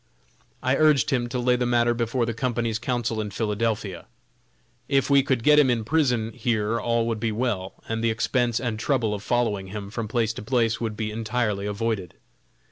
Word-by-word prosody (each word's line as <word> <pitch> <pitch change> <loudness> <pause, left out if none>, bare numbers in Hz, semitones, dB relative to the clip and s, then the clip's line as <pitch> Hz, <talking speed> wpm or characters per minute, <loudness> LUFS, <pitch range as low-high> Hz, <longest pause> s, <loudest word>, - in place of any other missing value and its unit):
I 130 +1 +2
urged 155 -2 +4
him 120 -3 0
to 125 - -3
lay 125 0 +2
the 125 0 0
matter 120 -1 +3
before 120 +1 0
the 115 - -2
Company's 115 -2 -1
counsel 120 -2 -1
in 105 - -4
Philadelphia. 105 -2 -2 0.8
If 135 0 +2
we 140 0 +7
could 130 -3 0
get 150 +2 +6
him 140 -3 +5
in 120 -2 +1
prison 125 -6 +1
here 115 -2 0
all 115 -1 +1
would 115 -2 -2
be 115 0 -1
well, 105 -5 -2
and 115 0 -2
the 115 - +3
expense 120 +1 0
and 115 -4 -3
trouble 120 -4 +1
of 100 - -4
following 105 -4 0
him 100 0 -7
from 115 0 -3
place 115 0 0
to - - -7
place 115 0 0
would 110 -2 -3
be 110 -1 -2
entirely 110 -2 -1
avoided. 105 -3 -2
115 Hz, 195 wpm, -25 LUFS, 110-125 Hz, 0.8 s, we